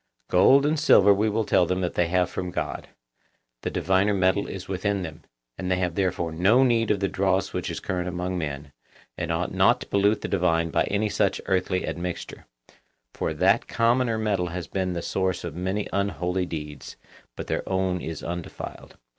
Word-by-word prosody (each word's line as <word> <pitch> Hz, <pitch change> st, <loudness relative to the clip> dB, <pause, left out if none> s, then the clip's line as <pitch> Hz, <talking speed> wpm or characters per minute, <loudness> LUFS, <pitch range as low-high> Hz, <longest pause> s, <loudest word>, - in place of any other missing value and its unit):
Gold 130 Hz, +10 st, +6 dB
and 155 Hz, +1 st, +1 dB
silver 100 Hz, -, +6 dB
we 105 Hz, +2 st, +1 dB
will 110 Hz, +1 st, 0 dB
tell 90 Hz, -3 st, +3 dB
them 90 Hz, +1 st, -1 dB
that 90 Hz, -, -1 dB
they 90 Hz, -, +1 dB
have 90 Hz, +1 st, +2 dB
from 90 Hz, 0 st, -4 dB
God; -, -, -4 dB, 0.7 s
the -, -, -2 dB
diviner 95 Hz, +4 st, +1 dB
metal 95 Hz, +2 st, +2 dB
is 95 Hz, -1 st, -7 dB
within 95 Hz, +1 st, -1 dB
them, 80 Hz, -1 st, -8 dB, 0.4 s
and 90 Hz, -, -3 dB
they 95 Hz, -, +3 dB
have 90 Hz, -2 st, -1 dB
therefore 90 Hz, -3 st, -1 dB
no 100 Hz, +11 st, +4 dB
need 115 Hz, -3 st, +2 dB
of 100 Hz, -2 st, +1 dB
the 100 Hz, -, +2 dB
dross 95 Hz, 0 st, 0 dB
which 90 Hz, -, -3 dB
is -, -, -4 dB
current 90 Hz, -1 st, -3 dB
among 90 Hz, +1 st, -3 dB
men, 75 Hz, -4 st, -4 dB, 0.4 s
and -, -, -3 dB
ought -, -, -1 dB
not -, -, +4 dB
to -, -, -6 dB
pollute 100 Hz, +2 st, +2 dB
the -, -, -3 dB
divine 85 Hz, -3 st, +1 dB
by -, -, +2 dB
any 105 Hz, +2 st, 0 dB
such 105 Hz, -, 0 dB
earthly 95 Hz, 0 st, 0 dB
admixture; 90 Hz, 0 st, -5 dB, 0.7 s
for -, -, -2 dB
that -, -, +2 dB
commoner 115 Hz, 0 st, +2 dB
metal 100 Hz, -5 st, 0 dB
has 90 Hz, 0 st, -5 dB
been 95 Hz, +3 st, -2 dB
the 85 Hz, -1 st, -4 dB
source 95 Hz, -1 st, -1 dB
of 85 Hz, -3 st, -5 dB
many 95 Hz, +4 st, -2 dB
unholy 90 Hz, -1 st, -1 dB
deeds, 75 Hz, -3 st, -7 dB, 0.4 s
but -, -, -6 dB
their -, -, -1 dB
own 95 Hz, -2 st, 0 dB
is 80 Hz, 0 st, -6 dB
undefiled. 85 Hz, 0 st, -7 dB
95 Hz, 190 wpm, -25 LUFS, 90-100 Hz, 0.7 s, Gold